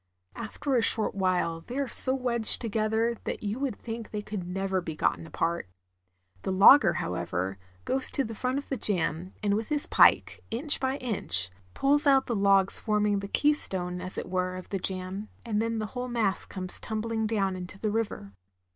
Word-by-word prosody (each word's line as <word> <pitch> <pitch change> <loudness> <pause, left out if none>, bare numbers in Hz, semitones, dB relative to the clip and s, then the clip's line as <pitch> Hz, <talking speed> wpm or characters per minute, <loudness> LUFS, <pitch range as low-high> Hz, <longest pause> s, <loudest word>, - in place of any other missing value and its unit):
After 270 +5 -5
a 245 - +3
short 225 -1 +2
while 180 -4 -1
they 250 - -6
are 280 -1 -1
so 260 +2 +4
wedged 240 -4 +6
together 225 +1 -1
that - - -5
you 210 +4 -3
would 270 -6 -3
think 225 -1 -7
they 210 -1 -5
could 200 -4 -6
never 190 0 -2
be 160 -2 -7
gotten 165 - -1
apart. 165 - -3 0.7
The - - -3
logger, 195 +1 +6
however, 90 - -4 0.3
goes 265 0 0
to 275 - -1
the 225 - -7
front 255 +4 -3
of 285 - -6
the 270 - -3
jam, 180 -4 -2
and 205 -1 +1
with 220 +2 -2
his 295 -1 -1
pike, - - +3
inch 275 +6 0
by 265 +1 -2
inch, 90 - 0 0.2
pulls 290 +2 +4
out 270 -1 +4
the 235 - -3
logs 195 -1 +6
forming 210 -2 0
the 200 - -6
keystone, 190 -10 0
as 185 0 -6
it - - -5
were, 185 0 -2
of 185 - -10
the 195 - -3
jam, 190 +3 -4 0.2
and 215 -2 -1
then 230 0 -2
the 215 - -3
whole 250 0 -4
mass 230 -5 -2
comes 185 -2 -6
tumbHng 220 0 -3
down 195 -4 -1
into 185 +2 -9
the 215 0 -2
river. 205 - -4
210 Hz, 190 wpm, -27 LUFS, 185-235 Hz, 0.7 s, wedged